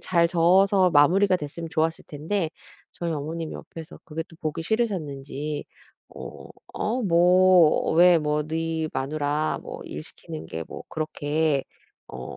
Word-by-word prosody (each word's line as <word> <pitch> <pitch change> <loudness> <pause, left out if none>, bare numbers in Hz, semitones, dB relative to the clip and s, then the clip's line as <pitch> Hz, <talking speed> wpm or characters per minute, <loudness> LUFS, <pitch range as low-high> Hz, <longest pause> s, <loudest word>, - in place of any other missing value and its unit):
잘 170 -2 +2
저어서 185 +3 +4
마무리가 185 +6 +4
됐으면 165 +1 -6
좋았을 160 +1 0
텐데 160 +4 -2 0.4
저희 170 -1 -4
어머님이 160 +2 -4
옆에서 165 -1 -10
그게 160 +1 -4
또 165 - -16
보기 155 0 -4
싫으셨는지 150 - -2 0.5
"어 - - -9 0.3
어 240 +4 -1
뭐 180 -2 +5
왜 175 +1 +7
뭐 150 -1 0
너희 160 +1 -2
마누라 145 +2 -1
뭐 - - -8
일 75 - -7
시키는 80 0 -9
게 80 +1 -5
뭐 - - -8
그렇게 155 -2 -1 0.4
어 - - -8
160 Hz, 270 characters per minute, -25 LUFS, 150-175 Hz, 0.5 s, 왜